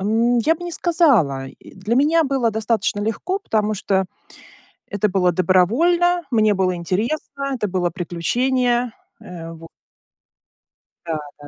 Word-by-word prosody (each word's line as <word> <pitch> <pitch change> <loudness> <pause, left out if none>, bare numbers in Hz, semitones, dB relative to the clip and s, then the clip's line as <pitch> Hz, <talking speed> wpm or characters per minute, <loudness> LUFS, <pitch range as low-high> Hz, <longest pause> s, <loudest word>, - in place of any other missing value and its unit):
Ам, 230 +4 +2
я 310 +8 +2
бы 335 - -11
не 350 - -5
сказала, 265 - +2
и, - - -16
для 205 +5 -2
меня 310 +5 +4
было 265 -6 0
достаточно 220 -1 -1
легко. 225 - -2
Потому 215 - -1
что, 190 -1 0 0.8
это 205 +1 0
было 180 -2 +2
добровольно, 290 - +2
мне 215 -3 +3
было 185 -1 0
интересно, 240 - -3
это 210 -5 -2
было 180 -2 -1
приключение, 240 +8 0 0.3
э, 165 -2 -9
во 165 0 -12 1.4
Да, 165 -2 -2 0.2
да. 145 - -11
215 Hz, 135 wpm, -20 LUFS, 185-270 Hz, 1.4 s, меня